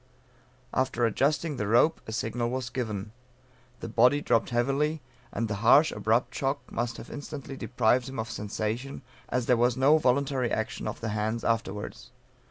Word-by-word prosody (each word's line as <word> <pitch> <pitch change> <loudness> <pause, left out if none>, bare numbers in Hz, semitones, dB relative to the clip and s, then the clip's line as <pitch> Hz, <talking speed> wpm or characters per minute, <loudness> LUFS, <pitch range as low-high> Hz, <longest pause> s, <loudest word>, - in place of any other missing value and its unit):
After 130 -2 +1
adjusting 145 +6 +1
the 105 - -2
rope, 120 +9 +3
a - - -5
signal 115 +2 -2
was 125 -1 -3
given. 105 -5 -4 0.7
The - - -4
body 125 +5 +4
dropped 115 -6 +1
heavily, 135 +6 +1 0.3
and 115 - -2
the 105 -1 -3
harsh 140 +7 +6
abrupt 115 +3 +1
shock 135 +1 -1
must 120 0 -2
have - - -10
instantly 145 -2 -7
deprived 125 0 +1
him 135 - -7
of 110 +1 -3
sensation, 110 +6 -4 0.3
as 125 -2 0
there 125 - +3
was 120 +1 +2
no 145 +4 +5
voluntary 130 -2 +1
action 110 +1 -2
of - - -5
the 115 - -2
hands 110 +2 -2
afterwards. 110 -3 -2
120 Hz, 165 wpm, -28 LUFS, 110-135 Hz, 0.7 s, harsh